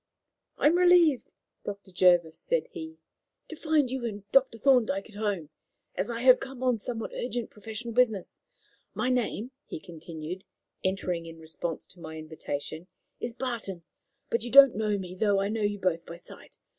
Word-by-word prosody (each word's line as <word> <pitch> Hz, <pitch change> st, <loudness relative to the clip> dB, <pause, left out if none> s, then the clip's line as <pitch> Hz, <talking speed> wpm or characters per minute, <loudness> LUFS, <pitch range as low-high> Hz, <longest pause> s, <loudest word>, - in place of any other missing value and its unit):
"I -, -, 0 dB
am 335 Hz, +4 st, +5 dB
relieved, 350 Hz, -6 st, +5 dB, 0.3 s
Dr. 200 Hz, -1 st, -7 dB
Jervis," 175 Hz, -3 st, +4 dB
said -, -, 0 dB
he, 320 Hz, -5 st, -8 dB, 0.5 s
"to 320 Hz, -, -6 dB
find 305 Hz, -5 st, +2 dB
you 260 Hz, -2 st, -3 dB
and 205 Hz, -4 st, -4 dB
Dr. 265 Hz, -4 st, +4 dB
Thorndyke 225 Hz, -5 st, +3 dB
at -, -, -16 dB
home, 205 Hz, -8 st, -2 dB, 0.4 s
as 190 Hz, +4 st, -2 dB
I 235 Hz, 0 st, -3 dB
have 255 Hz, -1 st, +8 dB
come 265 Hz, -1 st, -7 dB
on 250 Hz, -3 st, +2 dB
somewhat 225 Hz, +1 st, -4 dB
urgent 240 Hz, -1 st, -3 dB
professional 225 Hz, +2 st, -6 dB
business. 225 Hz, -6 st, +1 dB, 0.6 s
My 250 Hz, -, 0 dB
name," 250 Hz, -1 st, -1 dB, 0.2 s
he -, -, -6 dB
continued, 165 Hz, +2 st, -7 dB, 0.4 s
entering 180 Hz, -3 st, -1 dB
in 165 Hz, 0 st, -10 dB
response 160 Hz, +1 st, -4 dB
to 185 Hz, -, -14 dB
my 160 Hz, -1 st, -8 dB
invitation, 155 Hz, +1 st, -5 dB, 0.3 s
"is 235 Hz, -1 st, -4 dB
Barton, 230 Hz, -9 st, -4 dB, 0.5 s
but 230 Hz, -, +1 dB
you 240 Hz, -, -4 dB
don't 275 Hz, 0 st, +9 dB
know 210 Hz, -1 st, 0 dB
me, 185 Hz, -2 st, -6 dB
though 200 Hz, +1 st, +2 dB
I 200 Hz, +1 st, 0 dB
know 220 Hz, +1 st, -2 dB
you 205 Hz, 0 st, 0 dB
both 175 Hz, -4 st, 0 dB
by 170 Hz, -, -7 dB
sight. 170 Hz, -, -13 dB
215 Hz, 170 wpm, -28 LUFS, 180-250 Hz, 0.6 s, don't